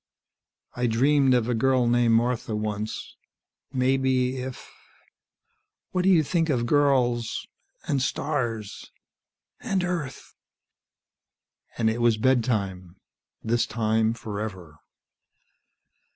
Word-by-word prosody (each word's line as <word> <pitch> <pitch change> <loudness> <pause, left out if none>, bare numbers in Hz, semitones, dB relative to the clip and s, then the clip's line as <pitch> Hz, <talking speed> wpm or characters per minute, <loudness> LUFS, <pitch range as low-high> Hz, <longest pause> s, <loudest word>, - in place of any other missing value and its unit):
"I 125 0 0
dreamed 135 +3 +3
of 120 -2 +1
a 125 - 0
girl 130 +1 +2
named 120 -1 +3
Martha 115 -1 0
once. 105 0 -4 0.6
Maybe 130 -1 +1
if 130 0 -7 0.6
" 435 -2 -52
"What 185 - 0
do - - +5
you 170 -5 +5
think 165 +2 0
of 120 -5 +1
girls? 125 -4 +1 0.4
And 140 -2 +1
stars? 120 -6 -3 0.7
And 190 -2 -1
Earth?" 170 -8 -4 1.4
And 115 - +1
it 110 +2 0
was 120 -2 +3
bedtime, 105 -7 0 0.5
this 115 +1 +1
time 110 0 +1
forever. 100 -8 -7
120 Hz, 105 wpm, -25 LUFS, 110-135 Hz, 1.4 s, do